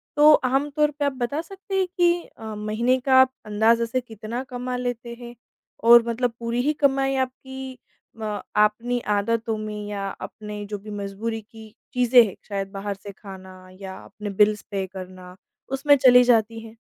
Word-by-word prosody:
तो 300 +1 +7
आमतौर 290 +3 +1
पे 290 - +1
आप 280 - 0
बता 265 +5 -2
सकते 390 +2 -8
हैं 375 - +1
कि 345 0 +3
अ, 220 -1 -7
महीने 225 +5 0
का 260 0 +5 0.2
अंदाज़े 225 +3 +3
से 255 +2 -2
कितना 230 +2 -6
कमा 250 0 -4
लेते 245 -1 -4
हैं? 240 0 -10 0.5
और 235 0 +8
मतलब 235 0 -1
पूरी 235 +1 -1
ही 300 +3 +1
कमाई 270 -2 +1
आपकी 265 0 -4 0.4
म 210 -2 -3 0.2
अपनी 230 +4 +2 0.2
आदतों 225 +2 -1
में 215 0 -5
या 200 -1 -4
अपने 210 -1 -7
जो 205 0 -5
भी 210 +2 -12
मज़बूरी 205 +3 -4
की 220 0 -15 0.2
चीज़ें 245 -1 +6
हैं, 190 - -8
शायद 195 -1 -3
बाहर 200 0 -4
से 200 - -8
खाना 190 -2 -12
या 190 -1 -7
अपने 205 +1 -7
बिल्स 210 0 +4
पे 195 -1 -1
करना। 185 -1 -10 0.4
उसमें 285 +2 +4
चली 250 -1 +7
जाती 225 -2 +2
हैं? 225 0 -12
230 Hz, 170 wpm, -24 LUFS, 210-255 Hz, 0.5 s, और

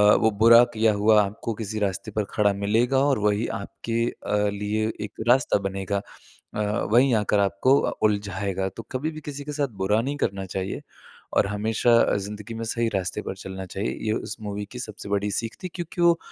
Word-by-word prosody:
वो 110 -1 +3
बुरा 115 +3 +7
किया 110 -1 +3
हुआ 105 +1 +5
आपको 105 +3 -4
किसी 110 0 -4
रास्ते 100 +1 -2
पर 105 +1 0
खड़ा 105 -2 +3
मिलेगा 110 +6 +1
और 140 -4 +2
वही 105 +2 +1
आपके 115 +3 -3
अ, 105 -2 -1
लिए 105 +2 -1
एक 105 - -5
रास्ता 125 -1 +4
बनेगा। 95 0 -2 0.6
अ, 105 - 0 0.3
वहीं 125 +3 +5
आकर 105 -1 +2
आपको 100 +7 +3
अ, - - 0
उलझाएगा। 100 -2 0
तो 115 +5 -9
कभी 140 +5 -2
भी 155 0 -9
किसी 145 -1 -6
के 150 - -6
साथ 145 -1 0
बुरा 105 +3 +2
नहीं 140 +4 -2
करना 95 -6 -1
चाहिए 95 +1 -4 0.6
और - - +4
हमेशा 110 +3 +1
अ, - - +2
ज़िंदगी 105 +2 -6
में 115 - -4
सही 115 +1 -1
रास्ते 95 +2 -2
पर 95 - -5
चलना 95 0 -7
चाहिए। 95 +3 -3 0.2
ये 110 - +2
उस 110 - -4
मूवी 105 -1 -4
की 125 - -7
सबसे 110 -4 -7
बड़ी 100 0 0
सीख 115 +3 -3
थी। - - -2
क्योंकि 175 0 -4
वो 170 -1 +5
105 Hz, 200 wpm, -25 LUFS, 100-115 Hz, 0.6 s, बुरा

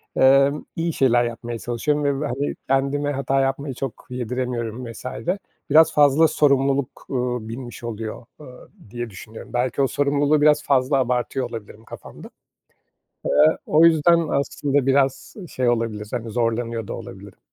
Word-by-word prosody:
emm, 135 +2 +4
iyi 165 -1 -1
şeyler 120 -2 +3
yapmaya 120 0 -5
çalışıyorum 145 +5 -1
ve 140 -1 0
ve, 150 - -2
hani, 140 +3 -3
kendime 140 +2 0
hata 135 0 0
yapmayı 135 +1 -2
çok 135 0 -6
yediremiyorum 125 -1 -4
vs. 115 - -12 0.6
Biraz 160 +2 +6
fazla 150 +2 +5
sorumluluk, 140 -2 +1
ııı, 125 -3 -2
binmiş 120 0 -8
oluyor, 115 0 -6 0.2
ııı, 125 -4 -13 0.2
diye 120 0 -5
düşünüyorum. 110 +4 -11
Belki 125 +3 0
o 135 - +3
sorumluluğu 145 +2 +1
biraz 150 0 +4
fazla 135 0 +2
abartıyor 125 +1 -1
olabilirim 110 -1 -9
kafamda. - - -11 1.0
Eee, - - 0 0.3
o 160 +2 +5
yüzden 165 0 +4
aslında 140 -1 0
biraz 135 0 +1
şey 125 -2 0
olabilir, 115 -3 -2
hani, 115 -2 -4
zorlanıyor 115 -1 -2
da - - -5
olabilirim. - - -10
130 Hz, 145 wpm, -22 LUFS, 120-140 Hz, 1.0 s, Biraz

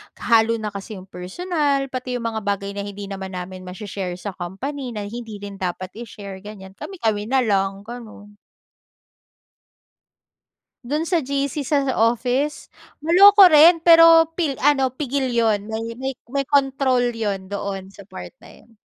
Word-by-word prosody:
kahalo 230 0 +3
na 215 -2 -4
kasi 200 +2 -8
yung 185 - -10
personal, 275 - -2
pati 255 -1 -4
yung 245 - -4
mga 220 -2 -5
bagay 200 0 -2
na 200 - -7
hindi 205 0 -8
naman 190 -1 -6
namin 185 0 -7
mashi-share 185 -1 -5
sa 195 +3 -6
company 240 +9 -6
na 210 - -4
hindi 225 +1 -7
rin 200 -1 -9
dapat 185 0 -4
i-share 200 -4 -9
ganyan, 195 -1 -11
kami-kami 215 - -3
na 260 +1 +2
lang 195 -2 0
gano'n. 215 -3 -11 2.6
Do'n 305 +2 0
sa 340 -3 +1
GC 280 +2 -2
sa 290 +2 +1 0.2
office? 245 +6 0 0.3
Maloko 390 +5 +8
rin, 330 +1 +7
pero 330 -1 +7
pil 305 -6 -2
ano 270 -2 +3
pigil 265 -1 -2
yun, 225 -4 +1
may 220 +1 -3
may 265 +2 -3 0.2
may 275 - +1
control 270 -2 +2
yun 200 -4 -3
doon 200 -1 -5
sa 200 +1 -14
part 200 - -10
na - - -14
yun. 230 - -24
230 Hz, 150 wpm, -21 LUFS, 200-275 Hz, 2.6 s, Maloko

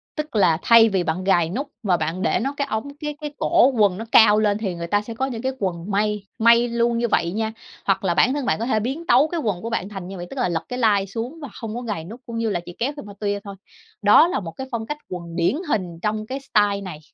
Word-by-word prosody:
Tức 305 -5 -5
là 170 -6 +4
thay 230 -1 +7
vì 190 -3 0
bạn 170 +3 -2
gài 175 -4 +3
nút 270 +9 -3 0.2
và 185 -4 +2
bạn 160 +4 -3
để 225 - +1
nó 270 +4 -2
cái 280 -1 -1
ống 280 +6 -4
cái 300 -1 -4
cái 295 -1 -5
cổ 250 - +4
quần 205 -6 +2
nó 225 - -5
cao 215 -1 +7
lên 205 -1 +2
thì 195 -5 -3
người 170 0 -5
ta 205 +3 +2
sẽ 230 +2 -7
có 260 +4 -1
những 240 -4 -5
cái 260 +1 -1
quần 185 0 -3
may, 210 0 0 0.2
may 235 +1 +5
luôn 235 0 +1
như 235 0 +1
vậy 170 -5 +1
nha. 220 +3 -2 0.3
Hoặc 195 0 +1
là 180 -3 +2
bản 250 +8 +3
thân 285 -3 -2
bạn - - +1
có 230 - -1
thể 220 -3 +1
biến 270 +10 -4
tấu 265 +6 +5
cái 335 +1 -3
quần 205 - -2
của 230 - -4
bạn 205 -4 -2
thành 195 -3 -7
như 195 - -7
vậy, 175 0 -7
tức 270 - -6
là 245 - +1
lật 165 -1 -2
cái 250 - -4
lai 205 -4 +3
xuống 235 - -5
và 285 - -6
không 225 -1 -6
có 245 - -4
gài 210 -9 -4
nút, 225 +9 -10
cũng 230 -1 -6
như 230 -1 0
là 180 -4 -1
chỉ 175 - -10
kéo 260 +5 0
phéc-mơ-tuya 205 -4 -4
thôi. 200 -1 -8 0.5
Đó 210 +11 +7
là 355 - -1
một 170 -4 -6
cái 265 +9 -7
phong 225 -2 -3
cách 295 +5 -4
quần 170 -2 -7
điển 170 +9 +2
hình 180 - -2
trong 215 +1 -1
cái 265 +1 -4
style 205 -6 +1
này. 180 -6 -7
215 Hz, 285 wpm, -22 LUFS, 190-240 Hz, 0.5 s, thay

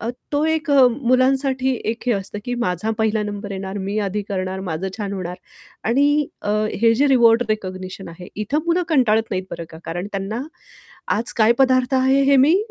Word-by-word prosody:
अ, 225 - -4 0.2
तो 290 +1 +1
एक 320 -1 -1
अ, 270 -2 +7
मुलांसाठी 260 +1 +1
एक 225 +1 -3
हे 240 - +3
असतं, 200 0 -3
की 245 - -2
माझा 180 +4 -1
पहिला 220 -1 +1
नंबर 205 0 -5
येणार, 190 +1 -5
मी 200 +2 -3
आधी 205 +2 -2
करणार, 190 -1 -3
माझं 185 0 -3
छान 200 -1 -3
होणार. 180 -2 -5 0.5
आणि 285 +5 +2 0.2
अ, 205 - -2 0.3
हे 230 0 +5
जे 280 +5 +3
रिवॉर्ड 235 -3 +5
रिकॉग्निशन 185 -3 -4
आहे, 170 +2 -10
इथं 215 +8 -1
पुन्हा 340 +1 +2
कंटाळत 245 -8 +3
नाहीत 185 -2 -2
बरं 170 - -5
का? 160 - -11
कारण 175 +4 -4
त्यांना 200 +5 -3 0.8
आज 230 - -3
काय 220 0 +5
पदार्थ 255 -1 +3
आहे 265 +1 +3
हे 280 - +6
मी 290 +7 +5
225 Hz, 190 wpm, -21 LUFS, 195-265 Hz, 0.8 s, अ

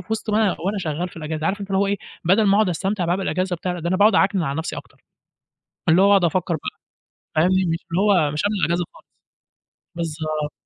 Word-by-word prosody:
في - - -13
وِسط 220 0 -2
ما 210 - +1
أنا 200 - +1
وأنا 200 +4 -1
شغّال 170 +1 -3
في 170 - -18
الإجازة، 155 0 -3
عارف 205 +2 -1
أنت 200 - -7
اللي 190 - +1
هو 200 - +2
إيه، 200 +1 0 0.3
بَدَل 195 +6 +4
ما 195 - +4
أقعُد 210 -2 +3
أستمتع 190 +2 -1
بقى 175 +2 +1
بالإجازة 185 -1 -1
وبتاع، 180 +1 -3
لا، 175 - -6
ده 170 - -2
أنا 185 - +1
باقعُد 210 +3 +5
أعكنِن 195 -2 +3
على 140 -1 -2
نَفْسي 160 - -4
أكتر، - - -12 0.9
اللي 170 +4 +5
هو 200 - +5
أقعُد 195 -3 +5
أفكّر 175 +1 0
بقى 150 - -7 0.6
فاهمني، 185 +4 +3
مش 165 - 0
اللي 180 - +1
هو 185 -8 +3
مش 150 - -2
قبل 205 +1 +1
الإجازة 170 +2 +1
خالص، - - -19 0.9
بالضبط. 155 -2 -3
180 Hz, 235 wpm, -22 LUFS, 160-195 Hz, 0.9 s, باقعُد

